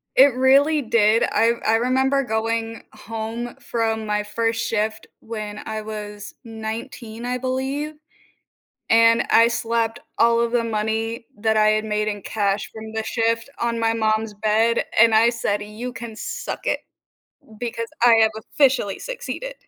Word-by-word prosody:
It 270 Hz, 0 st, +7 dB
really 280 Hz, +4 st, +4 dB
did. 225 Hz, -2 st, +3 dB
I 230 Hz, +2 st, +3 dB
I 220 Hz, -, +4 dB
remember 265 Hz, +3 st, +2 dB
going 225 Hz, 0 st, -2 dB
home 225 Hz, +2 st, -6 dB
from 225 Hz, -1 st, -2 dB
my 210 Hz, 0 st, 0 dB
first 225 Hz, +2 st, -1 dB
shift 220 Hz, 0 st, -2 dB
when 215 Hz, -2 st, -6 dB
I 220 Hz, 0 st, -4 dB
was 210 Hz, -1 st, -7 dB
19, 225 Hz, +1 st, -6 dB
I 250 Hz, +1 st, -1 dB
believe, 265 Hz, +4 st, -3 dB, 0.9 s
and 230 Hz, 0 st, +5 dB
I 230 Hz, +1 st, +6 dB
slapped 230 Hz, 0 st, -1 dB, 0.2 s
all 230 Hz, 0 st, +4 dB
of 235 Hz, 0 st, +1 dB
the 240 Hz, -1 st, +1 dB
money 225 Hz, +1 st, -2 dB
that 220 Hz, +1 st, +1 dB
I 215 Hz, 0 st, +4 dB
had 215 Hz, 0 st, +1 dB
made 210 Hz, 0 st, -1 dB
in 205 Hz, -2 st, -3 dB
cash 200 Hz, -1 st, -1 dB
from 220 Hz, 0 st, -9 dB
the 220 Hz, 0 st, -2 dB
shift 230 Hz, 0 st, 0 dB
on 235 Hz, -1 st, 0 dB
my 225 Hz, 0 st, +2 dB
mom's 220 Hz, -1 st, 0 dB
bed, 220 Hz, +3 st, +1 dB
and 230 Hz, 0 st, +6 dB
I 225 Hz, +2 st, +5 dB
said, 215 Hz, -3 st, -1 dB
"You 215 Hz, +4 st, -6 dB
can 235 Hz, -3 st, -8 dB
suck -, -, -5 dB
it, -, -, 0 dB, 0.8 s
because 230 Hz, -1 st, -4 dB, 0.2 s
I 240 Hz, -1 st, +7 dB
have 220 Hz, 0 st, +4 dB, 0.2 s
officially 260 Hz, -9 st, +2 dB
succeeded." -, -, -6 dB
225 Hz, 155 wpm, -22 LUFS, 220-235 Hz, 0.9 s, It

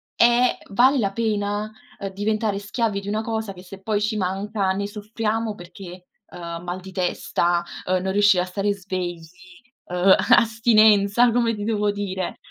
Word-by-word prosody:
è 240 Hz, +1 st, +4 dB
vale 260 Hz, +7 st, +4 dB
la 200 Hz, -3 st, 0 dB
pena, 210 Hz, -1 st, -1 dB, 0.3 s
uhm, 195 Hz, -, -4 dB
diventare 210 Hz, 0 st, -1 dB
schiavi 205 Hz, 0 st, -2 dB
di 200 Hz, -, -10 dB
una 215 Hz, +2 st, -1 dB
cosa, 220 Hz, -3 st, -3 dB
che 180 Hz, 0 st, -13 dB
se 195 Hz, +1 st, -12 dB
poi 210 Hz, 0 st, -1 dB
ci 215 Hz, 0 st, -1 dB
manca 195 Hz, +1 st, -1 dB
ne 200 Hz, +1 st, -2 dB
soffriamo, 215 Hz, +1 st, -3 dB
perché 180 Hz, 0 st, -11 dB, 0.3 s
ehm, 170 Hz, 0 st, -7 dB
mal 180 Hz, +1 st, -4 dB
di 190 Hz, 0 st, -11 dB
testa, 175 Hz, -1 st, 0 dB, 0.3 s
uhm, 185 Hz, -, +2 dB
non 190 Hz, 0 st, -2 dB
riuscire 205 Hz, -2 st, +4 dB
a -, -, -4 dB
stare 200 Hz, +2 st, -1 dB
svegli, 185 Hz, -3 st, -5 dB, 0.6 s
uhm, 180 Hz, +2 st, +4 dB, 0.2 s
astinenza 220 Hz, 0 st, +4 dB
come 230 Hz, -1 st, +1 dB
ti 205 Hz, 0 st, -5 dB
devo 210 Hz, -2 st, +1 dB
dire. 190 Hz, -3 st, -4 dB
205 Hz, 165 wpm, -23 LUFS, 190-220 Hz, 0.6 s, è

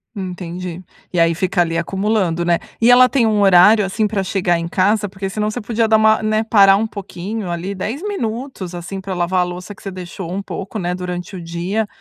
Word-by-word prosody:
Entendi. 180 Hz, -2 st, -6 dB, 0.3 s
E 175 Hz, -, +1 dB
aí 165 Hz, 0 st, +3 dB
fica 180 Hz, 0 st, 0 dB
ali 165 Hz, -1 st, 0 dB
acumulando, 190 Hz, -1 st, 0 dB
né? 170 Hz, 0 st, +2 dB, 0.2 s
E 230 Hz, -, +5 dB
ela 250 Hz, +1 st, +8 dB
tem 250 Hz, -3 st, +2 dB
um 210 Hz, -1 st, +2 dB
horário, 200 Hz, +2 st, +6 dB
assim, 210 Hz, +3 st, 0 dB
pra 200 Hz, -2 st, -1 dB
chegar 180 Hz, -2 st, 0 dB
em 170 Hz, 0 st, -3 dB
casa? 205 Hz, +4 st, +1 dB
Porque 195 Hz, 0 st, -5 dB
senão 210 Hz, +2 st, -2 dB
você 245 Hz, +2 st, -5 dB
podia 225 Hz, +1 st, 0 dB
dar, 220 Hz, 0 st, +4 dB
né, 215 Hz, 0 st, +1 dB
parar 200 Hz, -3 st, +6 dB
um 220 Hz, +3 st, 0 dB
pouquinho, 200 Hz, 0 st, -6 dB
ali 180 Hz, +4 st, -4 dB
10 220 Hz, -, -4 dB
minutos, 240 Hz, -, -4 dB
assim, 175 Hz, +3 st, -6 dB
pra 190 Hz, 0 st, -5 dB
lavar 180 Hz, +1 st, +1 dB
a -, -, +3 dB
louça 180 Hz, +3 st, -7 dB
que -, -, -18 dB
você 195 Hz, -, -5 dB
deixou 180 Hz, -1 st, -7 dB
um 195 Hz, +2 st, -2 dB
pouco, 195 Hz, +2 st, -6 dB
né, 180 Hz, -1 st, -2 dB
durante 180 Hz, +1 st, -5 dB
o 180 Hz, -, -6 dB
dia, 180 Hz, +6 st, -2 dB
195 Hz, 215 wpm, -18 LUFS, 180-215 Hz, 0.3 s, ela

